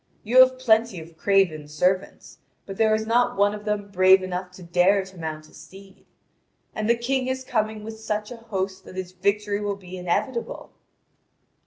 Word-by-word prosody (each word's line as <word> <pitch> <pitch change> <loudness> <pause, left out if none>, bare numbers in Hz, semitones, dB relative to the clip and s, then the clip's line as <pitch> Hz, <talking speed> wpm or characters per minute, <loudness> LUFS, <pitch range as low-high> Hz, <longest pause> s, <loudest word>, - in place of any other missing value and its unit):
You 240 +4 +4
have 255 0 +7
plenty 225 -5 +2
of 165 +1 -12
craven 175 -5 +1
servants, 180 +6 -2 0.3
but 195 -1 -8
there 220 -1 +3
is 220 0 -2
not 235 0 +2
one 205 +1 +3
of 210 0 -8
them 205 -1 -2
brave 185 0 +5
enough 180 0 -4
to 185 - -12
dare 180 +3 +2
to 190 0 -15
mount 155 -2 -6
a - - -22
steed. 195 0 -15 0.7
And 215 +1 -2
the 235 - +5
King 255 +2 -1
is 260 0 -2
coming 215 -4 -2
with 220 0 -8
such 210 0 -3
a 245 - -7
host 195 -4 -4
that - - -12
his 185 -1 -5
victory 200 +2 -1
will 205 -1 -2
be 185 -1 -10
inevitable." 235 +8 -3
200 Hz, 185 wpm, -24 LUFS, 185-220 Hz, 0.7 s, have